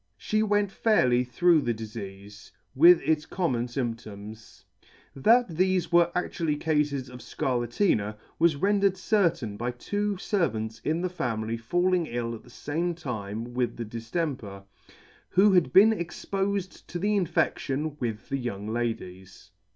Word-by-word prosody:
She 215 Hz, -, 0 dB
went 205 Hz, -2 st, +1 dB
fairly 130 Hz, -, +3 dB
through 160 Hz, +7 st, +3 dB
the 120 Hz, -4 st, -1 dB
difeafe, 100 Hz, -2 st, -9 dB, 0.2 s
with 170 Hz, +6 st, +7 dB
its 155 Hz, -1 st, 0 dB
com 180 Hz, -5 st, -1 dB
mon 120 Hz, 0 st, -1 dB
fymptoms. 110 Hz, -4 st, -6 dB, 0.5 s
That 230 Hz, -, +4 dB
thefe 185 Hz, +1 st, +1 dB
were 170 Hz, 0 st, +4 dB
actually 165 Hz, -3 st, -1 dB
Cafes 150 Hz, -4 st, 0 dB
of 125 Hz, 0 st, -10 dB
Scarlatina, 120 Hz, -, -1 dB, 0.2 s
was 165 Hz, -2 st, +4 dB
rendered 200 Hz, +3 st, +2 dB
certain 170 Hz, -, +1 dB
by 120 Hz, +3 st, -2 dB
two 205 Hz, +12 st, -2 dB
fervants 115 Hz, -, -2 dB
in 160 Hz, +3 st, 0 dB
the 185 Hz, -, -1 dB
family 115 Hz, -9 st, -2 dB
falling 175 Hz, +9 st, +1 dB
ill 120 Hz, -2 st, -3 dB
at 115 Hz, -, -8 dB
the -, -, -18 dB
fame 170 Hz, +4 st, -3 dB
time 115 Hz, -5 st, -5 dB
with 125 Hz, -1 st, -1 dB
the 120 Hz, -, -4 dB
diftemper, 115 Hz, -, -4 dB, 0.7 s
who 200 Hz, +3 st, +5 dB
had 180 Hz, -3 st, +3 dB
been 210 Hz, +4 st, +7 dB
expofed 195 Hz, 0 st, -3 dB
to 175 Hz, -, -5 dB
the 205 Hz, +4 st, +1 dB
infection 155 Hz, -5 st, 0 dB
with 115 Hz, -3 st, -4 dB
the 135 Hz, -, -1 dB
young 105 Hz, -5 st, -4 dB
ladies. 95 Hz, -6 st, -5 dB
140 Hz, 145 wpm, -27 LUFS, 115-180 Hz, 0.7 s, with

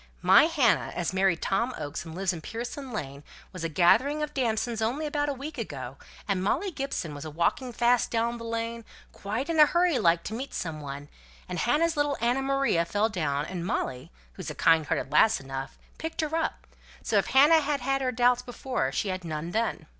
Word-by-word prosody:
"My -, -, +7 dB
Hannah, -, -, +2 dB
as 175 Hz, +1 st, -2 dB
married 190 Hz, -3 st, +2 dB
Tom 235 Hz, +6 st, 0 dB
Oakes, 145 Hz, +3 st, -5 dB
and 160 Hz, -1 st, -8 dB
lives 190 Hz, 0 st, 0 dB
in 165 Hz, -, -7 dB
Pearson's 245 Hz, -, -6 dB
Lane, 140 Hz, -, -6 dB, 0.3 s
was 180 Hz, -3 st, -6 dB
a 165 Hz, -, -1 dB
gathering 255 Hz, -, +3 dB
of 300 Hz, -, -4 dB
damsons 230 Hz, -3 st, -1 dB
only 255 Hz, +8 st, -1 dB
a 290 Hz, -1 st, -1 dB
week 275 Hz, +1 st, -7 dB
ago, 135 Hz, -, -6 dB, 0.3 s
and 195 Hz, -2 st, 0 dB
Molly 380 Hz, -, 0 dB
Gibson 275 Hz, -, -4 dB
was 145 Hz, 0 st, -7 dB
a 155 Hz, -, -6 dB
walking 170 Hz, -, 0 dB
fast 240 Hz, +1 st, +2 dB
down 235 Hz, +1 st, -1 dB
the -, -, -7 dB
lane, 230 Hz, 0 st, -3 dB, 0.3 s
quite 220 Hz, +7 st, -4 dB
in 330 Hz, -2 st, 0 dB
a 300 Hz, -, +9 dB
hurry 345 Hz, -5 st, +2 dB
like 170 Hz, -4 st, +3 dB
to -, -, -5 dB
meet 260 Hz, +5 st, -5 dB
some 160 Hz, -3 st, -4 dB
one, 140 Hz, 0 st, -7 dB, 0.4 s
and 180 Hz, -2 st, -4 dB
Hannah's 320 Hz, -, +2 dB
little 290 Hz, -1 st, 0 dB
Anna 240 Hz, +3 st, +1 dB
Maria 275 Hz, -10 st, +1 dB
fell 205 Hz, +6 st, 0 dB
down, 150 Hz, -8 st, -1 dB
and 180 Hz, 0 st, -5 dB
Molly 130 Hz, -, -3 dB, 0.2 s
(who's -, -, -7 dB
a -, -, -6 dB
kind 160 Hz, -2 st, +3 dB
hearted 135 Hz, +1 st, -2 dB
lass 220 Hz, +9 st, +5 dB
enough) 135 Hz, 0 st, -6 dB, 0.2 s
picked 320 Hz, +1 st, -3 dB
her 310 Hz, 0 st, -2 dB
up; 330 Hz, -, -2 dB, 0.4 s
so -, -, +2 dB
if -, -, -2 dB
Hannah 300 Hz, +4 st, +6 dB
had 285 Hz, -2 st, -1 dB
had 270 Hz, +2 st, 0 dB
her 255 Hz, -1 st, 0 dB
doubts 245 Hz, +1 st, +3 dB
before, 250 Hz, -, -3 dB
she 195 Hz, +9 st, -1 dB
had 185 Hz, -1 st, -3 dB
none 160 Hz, 0 st, -4 dB
then." 225 Hz, +2 st, -1 dB
230 Hz, 205 wpm, -27 LUFS, 170-270 Hz, 0.4 s, a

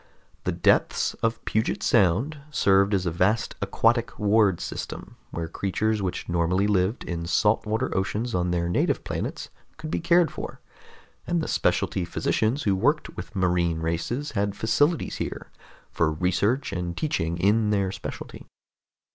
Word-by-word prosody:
The -, -, +1 dB
depths -, -, +2 dB
of 115 Hz, 0 st, -1 dB
Puget 110 Hz, +1 st, 0 dB
Sound 115 Hz, -, +2 dB
served 100 Hz, -7 st, +3 dB
as 95 Hz, -1 st, -1 dB
a 85 Hz, -, 0 dB
vast 95 Hz, +7 st, +1 dB
aquatic 115 Hz, +4 st, +1 dB
ward 105 Hz, -3 st, +3 dB
system -, -, -6 dB
where 85 Hz, -1 st, -4 dB
creatures 105 Hz, +5 st, -1 dB
which 95 Hz, -2 st, -3 dB
normally 85 Hz, +3 st, +1 dB
lived 100 Hz, +2 st, +1 dB
in 85 Hz, -1 st, -4 dB
salt 105 Hz, +5 st, +2 dB
water 110 Hz, +1 st, -1 dB
oceans 105 Hz, +5 st, -1 dB
on 90 Hz, 0 st, 0 dB
their 85 Hz, -1 st, 0 dB
native 85 Hz, -, +1 dB
planets -, -, -4 dB, 0.3 s
could 155 Hz, -1 st, -6 dB
be -, -, 0 dB
cared 170 Hz, 0 st, +3 dB
for, -, -, -7 dB, 0.7 s
and 175 Hz, 0 st, +1 dB
the 160 Hz, -, -2 dB
specialty 95 Hz, -, +1 dB
physicians 110 Hz, -, 0 dB
who 100 Hz, -2 st, +2 dB
worked 145 Hz, +11 st, 0 dB
with 110 Hz, -, -8 dB
marine 90 Hz, -3 st, +1 dB
races 90 Hz, -, -2 dB
had 100 Hz, -2 st, -1 dB
facilities 145 Hz, +8 st, +1 dB
here -, -, -5 dB, 0.4 s
for 80 Hz, -2 st, +1 dB
research 95 Hz, -, 0 dB
and 90 Hz, -1 st, -3 dB
teaching 85 Hz, -, -1 dB
in 105 Hz, +4 st, +3 dB
their 100 Hz, -2 st, +1 dB
specialty. -, -, -8 dB
100 Hz, 150 wpm, -25 LUFS, 90-115 Hz, 0.7 s, served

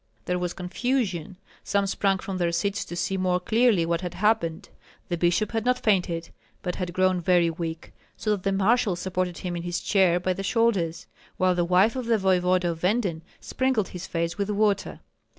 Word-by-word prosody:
There 180 Hz, 0 st, -1 dB
was 180 Hz, -1 st, -2 dB
confusion. 190 Hz, -, -2 dB, 0.3 s
Some 200 Hz, 0 st, +1 dB
sprang 195 Hz, 0 st, +1 dB
from 190 Hz, 0 st, -5 dB
their 170 Hz, -1 st, +1 dB
seats 200 Hz, +4 st, -1 dB
to 175 Hz, -, -7 dB
see 185 Hz, +2 st, -1 dB
more 180 Hz, -1 st, +1 dB
clearly 220 Hz, -3 st, +3 dB
what 170 Hz, +1 st, -1 dB
had 180 Hz, -2 st, -5 dB
happened. 195 Hz, -6 st, 0 dB, 0.4 s
The 175 Hz, -, 0 dB
bishop 175 Hz, +5 st, +1 dB
had 225 Hz, -1 st, -1 dB
not 250 Hz, +1 st, +2 dB
fainted, 180 Hz, -7 st, 0 dB, 0.3 s
but 180 Hz, -1 st, -3 dB
had 180 Hz, -2 st, -3 dB
grown 185 Hz, 0 st, +2 dB
very 175 Hz, -1 st, +3 dB
weak, 165 Hz, 0 st, -6 dB, 0.2 s
so 215 Hz, -, -1 dB
that 205 Hz, -3 st, 0 dB
the 195 Hz, -, 0 dB
marshal 200 Hz, 0 st, +2 dB
supported 180 Hz, 0 st, -2 dB
him 180 Hz, -1 st, -4 dB
in 170 Hz, -, -3 dB
his 175 Hz, 0 st, -3 dB
chair 185 Hz, -3 st, +3 dB
by 185 Hz, +1 st, 0 dB
the 190 Hz, -, -5 dB
shoulders, 195 Hz, -6 st, 0 dB, 0.3 s
while 185 Hz, 0 st, +3 dB
the 175 Hz, -1 st, +1 dB
wife 185 Hz, +7 st, +3 dB
of 255 Hz, -3 st, -4 dB
the 230 Hz, -1 st, +3 dB
voevoda 185 Hz, -2 st, +2 dB
of 165 Hz, -, -7 dB
Venden 185 Hz, -4 st, 0 dB, 0.2 s
sprinkled 260 Hz, -7 st, 0 dB
his 180 Hz, 0 st, -7 dB
face 170 Hz, +1 st, -2 dB
with 200 Hz, 0 st, -1 dB
water. 205 Hz, -1 st, 0 dB
185 Hz, 195 wpm, -25 LUFS, 175-205 Hz, 0.4 s, clearly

